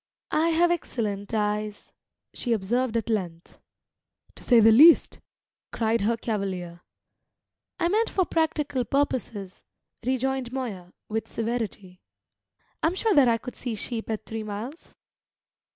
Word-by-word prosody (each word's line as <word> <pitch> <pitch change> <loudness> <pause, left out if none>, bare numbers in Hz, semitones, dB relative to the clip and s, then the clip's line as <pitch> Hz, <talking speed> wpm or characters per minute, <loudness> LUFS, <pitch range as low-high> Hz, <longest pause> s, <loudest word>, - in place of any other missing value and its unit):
"I 320 +2 +2
have 340 +1 +3
excellent 210 - -3
eyes," 210 -1 -2 0.4
she 240 - -1
observed 230 +3 0
at 225 - -2
length. 180 -7 -4 0.7
"To - - -14
say 240 -2 +5
the 225 0 +7
least!" 305 +9 +7 0.5
cried 225 -1 0
her 230 +3 +1
cavalier. 190 -6 -4 1.0
"I 340 - +2
meant 435 +5 +1
for 375 - +1
practical 300 -6 0
purposes," 230 -7 -2 0.4
rejoined 260 0 -1
Moya, 205 -9 -5
with 220 +1 -3
severity. 220 -5 -4 0.8
"I'm 330 +3 +1
sure 435 +2 +1
that 280 -6 +6
I 230 -1 +3
could 245 +2 -9
see 240 -3 -4
sheep 225 +2 -4
at 220 -1 -3
three 225 0 -5
miles." 215 +9 -7
230 Hz, 130 wpm, -26 LUFS, 210-265 Hz, 1.0 s, the